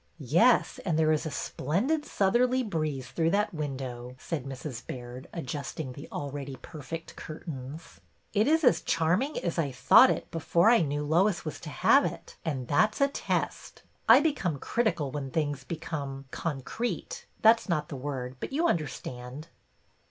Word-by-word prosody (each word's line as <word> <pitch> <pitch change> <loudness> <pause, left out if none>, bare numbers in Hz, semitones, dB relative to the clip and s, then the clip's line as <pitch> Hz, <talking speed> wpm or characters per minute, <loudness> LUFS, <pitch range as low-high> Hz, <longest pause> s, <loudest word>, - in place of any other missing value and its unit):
'' - - -40 0.2
Yes, - - +4
and 165 -5 0
there 155 -1 +4
is 155 +1 +1
a - - -2
splendid 210 - -1
southerly 245 +6 +2
breeze 155 - -2
through 165 -1 +1
that 205 +2 +1
window," 130 -5 -5
said 145 0 -4
Mrs. 135 -2 -6
Baird, 125 +1 -7
adjust 145 -2 -5
ing 130 -5 -4
the 140 - -9
already 140 -1 -5
perfect 160 +2 -7
curtains. 155 -1 -8 0.2
'' - - -41
It 215 +1 +3
is 320 +2 +3
as 250 - +5
charming 170 - +1
as 170 0 -1
I 145 -4 0
thought 130 - +7
it - - -2
before 170 +5 +3
I 240 - +6
knew 145 -1 -1
Lois 175 +4 +2
was 155 - -5
to 160 - -8
have - - +4
it, - - -5
and 135 -6 -3
that 215 +10 +3
's - - -6
a 280 - +5
test. - - -3 0.3
I 240 +5 +9
become 265 - 0
critical 175 - 0
when 140 -2 -4
things 145 -2 -1
become 140 -3 -5
— - - -34
concrete 165 - -4
— - - -34
that 225 +1 +7
's - - -12
not 155 -3 0
the - - -5
word, 130 -2 -5
but - - -5
you 320 +5 +2
understand." 140 - -4
155 Hz, 180 wpm, -29 LUFS, 135-195 Hz, 0.3 s, I